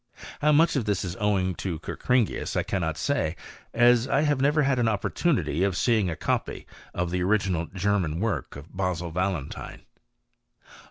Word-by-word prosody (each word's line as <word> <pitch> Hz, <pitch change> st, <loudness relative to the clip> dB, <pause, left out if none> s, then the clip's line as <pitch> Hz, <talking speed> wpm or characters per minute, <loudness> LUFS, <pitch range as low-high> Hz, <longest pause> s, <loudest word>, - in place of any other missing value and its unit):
Ham' 150 Hz, 0 st, +3 dB
much 165 Hz, +1 st, +4 dB
of 130 Hz, -6 st, 0 dB
this 105 Hz, -2 st, -1 dB
is 90 Hz, 0 st, -4 dB
owing 95 Hz, -3 st, +1 dB
to 90 Hz, -2 st, -4 dB
Kerkringius 125 Hz, +7 st, -1 dB
I -, -, +1 dB
cannot 80 Hz, -5 st, -2 dB
say, 90 Hz, -, -1 dB, 0.4 s
w6 120 Hz, +1 st, +4 dB
I 140 Hz, +3 st, +2 dB
have 145 Hz, -3 st, +1 dB
never 150 Hz, +2 st, +3 dB
had 135 Hz, -2 st, +1 dB
an 120 Hz, -, +2 dB
opportunity 100 Hz, -, 0 dB
of 95 Hz, -2 st, 0 dB
seeing 110 Hz, -6 st, +2 dB
a 80 Hz, -, -3 dB
copy -, -, -2 dB, 0.3 s
dfi 90 Hz, -1 st, -1 dB
the 90 Hz, 0 st, -1 dB
original 95 Hz, -4 st, +1 dB
German 95 Hz, -4 st, -1 dB
work 110 Hz, +1 st, -2 dB
of 75 Hz, +6 st, -12 dB
Basil 90 Hz, -3 st, -2 dB
Valentine. 90 Hz, -4 st, -3 dB
100 Hz, 165 wpm, -26 LUFS, 90-120 Hz, 0.4 s, much